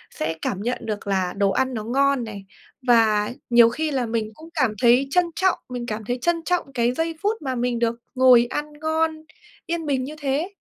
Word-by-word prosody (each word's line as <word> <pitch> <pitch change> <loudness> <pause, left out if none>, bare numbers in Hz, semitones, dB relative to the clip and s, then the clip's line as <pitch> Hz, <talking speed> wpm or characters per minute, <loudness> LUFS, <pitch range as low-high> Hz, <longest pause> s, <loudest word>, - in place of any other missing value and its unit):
sẽ 160 +1 -2
cảm 195 - -2
nhận 245 +4 -1
được 210 -2 -4
là 190 -2 0
đồ 200 -1 +2
ăn 260 +6 0
nó 220 -3 -4
ngon 275 +2 +2
này. 205 -3 -8 0.4
Và 220 -3 +4 0.2
nhiều 235 -1 +7
khi 315 +5 -2
là 260 -3 0
mình 220 -1 -2
cũng 320 +4 -13
cảm 230 -4 +2
thấy 250 +3 +5
trân 360 +2 +3
trọng 375 -1 +2
mình 245 -1 -5
cảm 215 -2 -5
thấy 245 +3 -2
trân 340 +1 0
trọng 345 -5 -1
cái 240 -1 +1
giây 325 +4 -2
phút 420 0 -1
mà 265 -3 -3
mình 245 -1 -1
được 235 0 +1 0.2
ngồi 255 -2 +6
ăn 295 +2 -4
ngon, 315 0 -1 0.4
yên 335 -1 -2
bình 270 -3 0
như 295 +4 -6
thế. 290 +6 -1
250 Hz, 215 wpm, -23 LUFS, 230-305 Hz, 0.4 s, nhiều